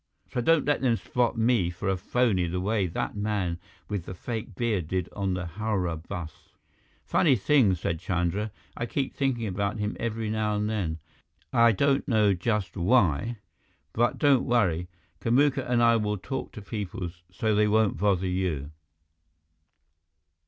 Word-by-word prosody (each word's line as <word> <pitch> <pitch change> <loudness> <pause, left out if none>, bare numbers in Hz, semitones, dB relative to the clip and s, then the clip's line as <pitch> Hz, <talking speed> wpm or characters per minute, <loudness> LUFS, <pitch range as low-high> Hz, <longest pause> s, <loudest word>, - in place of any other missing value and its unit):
So 125 - 0
don't 165 +4 +3
let 145 -1 +1
them 125 -3 +3
spot 120 +1 -1
me 115 -6 +2
for 90 +3 -5
a 95 - +2
phony 95 -1 +1
the 90 +2 -2
way 100 0 0
that 85 - -3
man 100 -5 -1 0.3
with 100 -5 -3
the 95 - -7
fake 110 +1 -5
beard 105 -8 -1
did 90 0 -1
on 95 -2 -1
the 90 0 -3
Howrah 90 -2 -2
bus." 85 0 -8 0.5
"Funny 145 -7 +3
thing," 115 -3 +3
said 80 -1 -2
Chandra, 90 +4 -1 0.3
"I 115 - -3
keep 135 +2 -2
thinking 130 -4 0
about 100 +2 -2
him 105 0 -2
every 115 -2 -2
now 110 -1 0
and 105 0 0
then, 95 -8 -2 0.6
I 115 -1 +6
don't 140 +6 +1
know 110 -5 +4
just 95 0 -1
why. 100 - +2 0.6
But 120 +2 +1
don't 140 -4 +4
worry. 90 -8 +1 0.3
Kamuka 135 +2 +2
and 120 -1 +3
I 115 0 +5
will 105 -1 -1
talk 130 +7 -5
to 105 -5 -9
people 100 -4 -4 0.2
so 110 +4 0
they 105 0 +3
won't 110 -3 +2
bother 95 0 +2
you." 90 -6 -2
105 Hz, 160 wpm, -27 LUFS, 90-115 Hz, 0.6 s, I